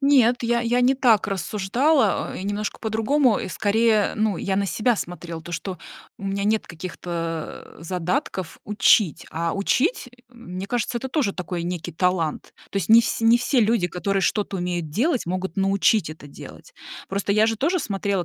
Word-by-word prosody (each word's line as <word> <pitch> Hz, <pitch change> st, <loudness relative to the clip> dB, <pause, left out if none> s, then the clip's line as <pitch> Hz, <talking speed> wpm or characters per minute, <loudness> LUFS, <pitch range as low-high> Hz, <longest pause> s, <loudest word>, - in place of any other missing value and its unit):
Нет, 255 Hz, -4 st, +4 dB
я 235 Hz, 0 st, +1 dB
я 240 Hz, +1 st, +1 dB
не 250 Hz, +2 st, +4 dB
так 235 Hz, -6 st, +3 dB
рассуждала, 210 Hz, -, +1 dB
э, -, -, -6 dB
и -, -, -6 dB
немножко 205 Hz, +1 st, -3 dB
по-другому, 225 Hz, +3 st, +2 dB
скорее. 215 Hz, +2 st, +2 dB
Ну, 215 Hz, -2 st, +1 dB
я 190 Hz, -1 st, -2 dB
на 200 Hz, 0 st, +1 dB
себя 230 Hz, +3 st, +1 dB
смотрела, 170 Hz, -2 st, -6 dB
то, 175 Hz, -, -9 dB
что 185 Hz, +2 st, -4 dB, 0.4 s
у -, -, -9 dB
меня 195 Hz, 0 st, -2 dB
нет 215 Hz, +1 st, +1 dB
каких-то 165 Hz, -1 st, -6 dB
задатков 180 Hz, +1 st, -3 dB
учить, 205 Hz, -4 st, +3 dB
а 165 Hz, +1 st, -2 dB
учить, 255 Hz, -, 0 dB, 0.2 s
мне 195 Hz, -6 st, -8 dB
кажется, 240 Hz, +2 st, -1 dB
это 265 Hz, -, -5 dB
тоже 265 Hz, -7 st, 0 dB
такой 180 Hz, -2 st, -4 dB
некий 175 Hz, -1 st, -4 dB
талант. 170 Hz, -2 st, -1 dB, 0.2 s
То -, -, -5 dB
есть 180 Hz, -, -3 dB
не 225 Hz, +1 st, +8 dB
всь 230 Hz, -, -2 dB
не 230 Hz, +1 st, +5 dB
все 250 Hz, +1 st, +1 dB
люди, 220 Hz, -4 st, +2 dB
которые 195 Hz, +3 st, -1 dB
что-то 205 Hz, -1 st, 0 dB
умеют 175 Hz, -2 st, -3 dB
делать, 245 Hz, -, 0 dB
могут 185 Hz, 0 st, -3 dB
научить 195 Hz, -1 st, +2 dB
это 155 Hz, -2 st, -11 dB
делать. 140 Hz, -, -12 dB, 0.4 s
Просто 200 Hz, +1 st, -1 dB
я 215 Hz, +2 st, +4 dB
же 225 Hz, 0 st, 0 dB
тоже 335 Hz, -, +1 dB
смотрела 200 Hz, -, -2 dB
200 Hz, 175 wpm, -23 LUFS, 180-235 Hz, 0.4 s, не